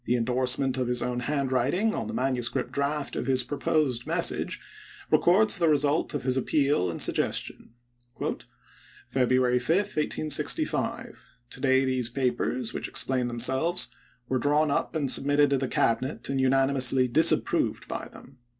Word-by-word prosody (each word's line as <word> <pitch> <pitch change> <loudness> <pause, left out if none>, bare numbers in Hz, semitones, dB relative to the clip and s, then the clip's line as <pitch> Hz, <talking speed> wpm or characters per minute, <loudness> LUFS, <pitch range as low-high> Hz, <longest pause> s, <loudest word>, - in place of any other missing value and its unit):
The 125 - +1
in 115 -2 -1
dorsement 130 +1 0
of 130 -2 -1
his 125 0 0
own 125 0 -2
handwriting 140 - 0
on - - -4
the - - -6
manu 130 -1 -1
script 120 - -2
draft 140 +1 -2
of - - -4
his 130 -2 +2
proposed 135 -2 -1
message - - -1 0.5
records 200 +3 +3
the 165 -2 +3
result 145 +1 +1
of 145 - -3
his 130 0 0
appeal 140 - +1
and 85 - -6
suggestion: - - -2 0.7
" - - -27
February 125 0 +1
5, 140 +7 +1
1865. 155 -6 -1 0.3
To - - -7
day 130 -1 +3
these 130 -2 -1
papers, 125 -1 -2
which - - -4
explain 130 -2 0
themselves, 130 +9 0 0.4
were 130 0 -1
drawn 145 +3 +1
up 140 - -2
and 145 -4 +1
submitted 145 +1 +2
to 135 - +2
the 135 - -2
Cabinet 130 +4 -1
and 135 -1 -1
unanimously 130 -1 +3
disapproved 155 +7 +3
by - - -5
them. 135 -1 -16
130 Hz, 155 wpm, -26 LUFS, 125-145 Hz, 0.7 s, records